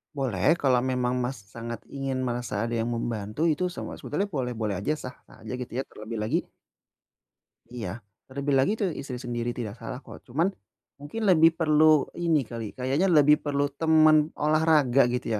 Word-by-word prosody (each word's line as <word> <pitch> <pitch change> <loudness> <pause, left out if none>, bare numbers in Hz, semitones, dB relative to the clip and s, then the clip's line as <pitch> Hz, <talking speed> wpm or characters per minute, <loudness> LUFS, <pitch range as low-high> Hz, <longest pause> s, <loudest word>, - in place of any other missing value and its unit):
Boleh, 135 - +2
kalau 130 -6 +2
memang, 125 0 0
Mas, 125 -3 -3
sangat 115 -1 -7
ingin 135 -2 -2
merasa 120 -4 -2
ada 115 +1 -3
yang 115 - -1
membantu, 110 +3 -3
itu 165 +2 +2
sama 180 - -6
sebetulnya 200 - -2
boleh-boleh 120 - -2
aja, 105 +10 0
sah-sah 130 -3 -11
aja, - - -6
gitu 125 - -7
ya. - - -1
Terlebih 110 -1 -8
lagi 150 +11 -1 1.2
Iya, 115 -3 -6 0.3
terlebih 140 +1 -2
lagi, 135 - +3
tuh 200 - +1
istri 135 -3 -6
sendiri. 120 -1 -3
Tidak 110 -4 -4
salah 115 +2 -6
kok. - - -11
Cuma, 135 +7 0 0.6
mungkin 145 +11 -6
lebih 165 -2 +6
perlu 155 -2 +4
ini 165 -3 +2
kali, 115 -1 -6
kayaknya 135 +8 +1
lebih 150 -2 +6
perlu 145 0 0
teman 155 0 +4
olahraga, 150 -4 +3
gitu 125 - -2
135 Hz, 165 wpm, -26 LUFS, 120-155 Hz, 1.2 s, lebih